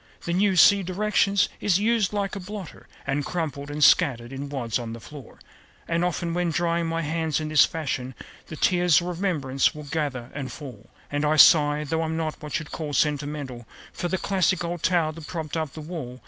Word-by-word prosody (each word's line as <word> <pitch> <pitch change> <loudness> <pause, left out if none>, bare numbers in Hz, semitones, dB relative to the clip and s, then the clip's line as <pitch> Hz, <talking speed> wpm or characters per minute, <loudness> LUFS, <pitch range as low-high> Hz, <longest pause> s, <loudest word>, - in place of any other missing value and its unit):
The 170 - -1
new 195 +1 +2
(see 200 +3 +7
directions) 200 +1 +1
is 190 -4 +2
"used 215 -1 +1
like 200 -1 -2
a - - -4
blotter," 195 -1 -9 0.2
And 140 +1 -1
crumpled 145 -5 -4
and 150 +1 -1
scattered 130 -6 +4
in 140 +1 -6
wads 125 -5 -2
on 115 -1 -6
the 115 - -8
floor. 140 +1 -12 0.5
And 170 +1 0
often, 175 -1 -1
when 175 0 0
drying 170 0 0
my 165 0 -2
hands 160 0 -1
in 155 -1 -4
this 155 -2 +6
fashion, 130 -5 -4 0.3
The 155 - -7
tears 175 0 +3
of 175 - -5
remembrance 165 -8 0
will 150 - -8
gather 140 -5 -3
and 140 -2 -5
fall, 120 -7 -10 0.2
And 145 0 -1
I 150 +1 +2
sigh 150 -1 +6
(though 160 +2 -1
I'm 160 0 -2
not 160 -2 -3
what 150 -1 -3
you'd 160 -2 -8
call 150 -3 -5
sentimental) 145 -5 -2 0.3
For 175 - -3
the 190 - -1
classic 185 -1 +1
old 170 -1 -4
towel 170 -3 +2
that 155 -1 -10
propped 160 -3 -5
up 155 -3 -3
the 155 - -8
wall. 150 -6 -7
160 Hz, 205 wpm, -25 LUFS, 145-175 Hz, 0.5 s, see